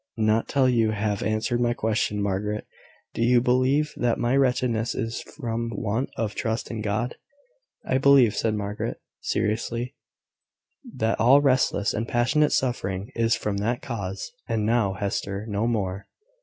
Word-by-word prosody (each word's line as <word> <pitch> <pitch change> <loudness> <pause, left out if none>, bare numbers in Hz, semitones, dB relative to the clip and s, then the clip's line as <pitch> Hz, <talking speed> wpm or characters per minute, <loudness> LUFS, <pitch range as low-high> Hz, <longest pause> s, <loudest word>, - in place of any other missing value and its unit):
"Not 110 0 +2
till 135 -2 +3
you 115 -3 +2
have 105 -1 -1
answered 110 +3 0
my 120 0 +1
question, 105 -2 0
Margaret. 105 +2 -2 0.5
Do - - -4
you 120 +1 +5
believe 130 +5 +2
that 120 -2 +1
my 120 +2 +1
wretchedness 125 -4 +1
is 115 0 -3
from 115 -5 -4
want 110 +5 -1
of 110 -2 -1
trust 110 +1 -2
in 110 -2 -4
God?" 110 +4 -2 0.7
"I 130 - +1
believe," 135 -5 +5
said 110 -1 0
Margaret, 105 0 -4 0.2
seriously, 115 +4 -2 1.0
"that 110 +1 0
all 125 +6 +6
restless 130 -7 +2
and 115 +2 -2
passionate 130 +6 +2
suffering 105 -4 -1
is 115 -1 +2
from 105 -1 -2
that 115 +5 -1
cause. 100 - -5 0.2
And 115 -4 0
now, 110 -3 +2
Hester, 100 0 -3
no 105 +1 -1
more." 100 -4 -2
115 Hz, 150 wpm, -25 LUFS, 105-125 Hz, 1.0 s, all